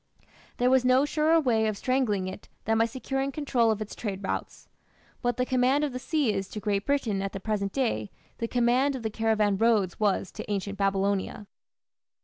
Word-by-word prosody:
There 250 Hz, +1 st, +3 dB
was 260 Hz, -1 st, +4 dB
no 255 Hz, +2 st, +4 dB
surer 310 Hz, +2 st, +3 dB
way 225 Hz, -7 st, +2 dB
of 215 Hz, -2 st, -2 dB
strangling 220 Hz, -6 st, 0 dB
it 185 Hz, -, -8 dB, 0.2 s
than 225 Hz, +1 st, +2 dB
by 225 Hz, -, +5 dB
securing 270 Hz, +3 st, -3 dB
control 260 Hz, -5 st, +1 dB
of 215 Hz, -1 st, 0 dB
its 210 Hz, -, -10 dB
trade 200 Hz, -3 st, -5 dB
routes. -, -, -4 dB, 0.5 s
What 245 Hz, -2 st, 0 dB
the 250 Hz, -, +1 dB
command 255 Hz, +3 st, +2 dB
of 290 Hz, -4 st, -1 dB
the 255 Hz, -, -4 dB
sea 265 Hz, -3 st, 0 dB
is 195 Hz, -, -2 dB
to 210 Hz, -, -6 dB
Great 205 Hz, -1 st, -1 dB
Britain 235 Hz, -9 st, 0 dB
at 195 Hz, 0 st, -3 dB
the 195 Hz, -, -4 dB
present 200 Hz, -1 st, -2 dB
day, 210 Hz, -, -1 dB, 0.3 s
the 230 Hz, -, -1 dB
command 250 Hz, +4 st, +2 dB
of 250 Hz, -, -6 dB
the 220 Hz, -, -2 dB
caravan 215 Hz, -2 st, +1 dB
roads 215 Hz, -6 st, +2 dB
was 205 Hz, -3 st, +1 dB
to -, -, -7 dB
ancient 200 Hz, 0 st, -3 dB
Babylonia. 195 Hz, +1 st, 0 dB
225 Hz, 195 wpm, -27 LUFS, 200-255 Hz, 0.5 s, by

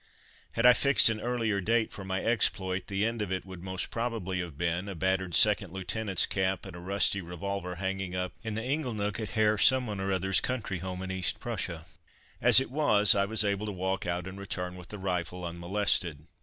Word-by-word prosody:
Had 115 Hz, -, 0 dB
I 125 Hz, -, +9 dB
fixed 140 Hz, -2 st, +5 dB
an 110 Hz, -1 st, -4 dB
earlier 115 Hz, -4 st, -1 dB
date 115 Hz, +3 st, +1 dB
for 100 Hz, -, -8 dB
my 95 Hz, 0 st, -3 dB
exploit 95 Hz, -5 st, 0 dB
the 100 Hz, +1 st, -1 dB
end 115 Hz, 0 st, -2 dB
of 100 Hz, -3 st, -3 dB
it 95 Hz, 0 st, -3 dB
would 95 Hz, -2 st, -10 dB
most 95 Hz, 0 st, -4 dB
probably 115 Hz, -6 st, -3 dB
have 85 Hz, -5 st, -6 dB
been 85 Hz, +4 st, -2 dB
a 95 Hz, -, -6 dB
battered 95 Hz, +1 st, 0 dB
second 105 Hz, -3 st, +5 dB
lieutenant's 95 Hz, +1 st, 0 dB
cap 95 Hz, -2 st, -1 dB
and -, -, -9 dB
a -, -, -8 dB
rusty 100 Hz, +2 st, +1 dB
revolver 90 Hz, +1 st, -5 dB
hanging 95 Hz, 0 st, -3 dB
up 90 Hz, 0 st, -3 dB
in 110 Hz, -2 st, -5 dB
the 110 Hz, -, -3 dB
ingle 130 Hz, -2 st, -2 dB
nook 105 Hz, 0 st, -2 dB
at 110 Hz, -3 st, -4 dB
Herr 105 Hz, -1 st, +3 dB
Someone 125 Hz, -6 st, +4 dB
or 95 Hz, 0 st, -2 dB
other's 95 Hz, 0 st, +2 dB
country 110 Hz, -8 st, -3 dB
home 95 Hz, +1 st, -5 dB
in 95 Hz, -, -5 dB
East 95 Hz, -1 st, +1 dB
Prussia. 80 Hz, -2 st, -4 dB, 0.6 s
As -, -, +8 dB
it 130 Hz, -2 st, -4 dB
was, 105 Hz, -9 st, +4 dB
I 100 Hz, -1 st, +1 dB
was 110 Hz, +1 st, 0 dB
able 100 Hz, +1 st, -1 dB
to -, -, -3 dB
walk 95 Hz, 0 st, -3 dB
out 90 Hz, 0 st, -2 dB
and 95 Hz, +1 st, -8 dB
return 90 Hz, -2 st, -5 dB
with 90 Hz, -1 st, -10 dB
the 105 Hz, -, -7 dB
rifle 90 Hz, -2 st, -3 dB
unmolested. 85 Hz, -3 st, 0 dB
95 Hz, 210 wpm, -29 LUFS, 90-110 Hz, 0.6 s, I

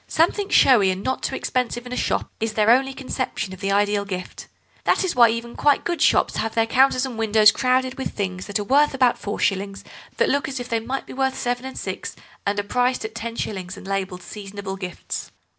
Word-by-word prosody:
Something 390 Hz, +5 st, +1 dB
showy 220 Hz, -8 st, +5 dB
and 185 Hz, +1 st, -2 dB
not 260 Hz, -, -1 dB
too -, -, -2 dB
expensive 245 Hz, -1 st, -2 dB
in 250 Hz, -, -6 dB
a -, -, -2 dB
shop -, -, -1 dB
is 225 Hz, 0 st, -2 dB
their 215 Hz, +1 st, +4 dB
only 265 Hz, +2 st, +3 dB
conception 255 Hz, -7 st, -4 dB
of 190 Hz, -, -10 dB
the 195 Hz, 0 st, -1 dB
ideal 205 Hz, 0 st, +2 dB
gift. 185 Hz, -3 st, -6 dB, 0.4 s
That -, -, +2 dB
is 370 Hz, -5 st, -1 dB
why 235 Hz, -2 st, +7 dB
even 230 Hz, +1 st, -4 dB
quite 290 Hz, -1 st, +3 dB
good 345 Hz, -1 st, -2 dB
shops -, -, +3 dB
have 225 Hz, 0 st, -2 dB
their 225 Hz, -1 st, +3 dB
counters 260 Hz, +2 st, +3 dB
and 245 Hz, -4 st, -6 dB
windows 215 Hz, -1 st, +6 dB
crowded 255 Hz, +2 st, 0 dB
with 265 Hz, -, -2 dB
things 185 Hz, -1 st, -4 dB
worth 275 Hz, +8 st, +3 dB
about 255 Hz, -2 st, +3 dB
four 205 Hz, -, -4 dB
shillings 195 Hz, -1 st, -1 dB, 0.3 s
that -, -, +3 dB
look 280 Hz, -1 st, +1 dB
as 265 Hz, -2 st, -4 dB
if 245 Hz, -, -5 dB
they 230 Hz, -1 st, 0 dB
might 255 Hz, +4 st, -4 dB
be -, -, -10 dB
worth 265 Hz, 0 st, 0 dB
seven 245 Hz, +1 st, -2 dB
and 265 Hz, -, -7 dB
six, -, -, -5 dB, 0.3 s
and 205 Hz, +1 st, +1 dB
are -, -, -1 dB
priced 245 Hz, +3 st, 0 dB
at 220 Hz, -, -6 dB
ten 230 Hz, 0 st, -5 dB
shillings 190 Hz, -5 st, -4 dB
and -, -, -11 dB
labelled 190 Hz, -2 st, -3 dB
seasonable 200 Hz, 0 st, -7 dB
gifts. 185 Hz, -2 st, -6 dB
230 Hz, 220 wpm, -23 LUFS, 200-260 Hz, 0.4 s, why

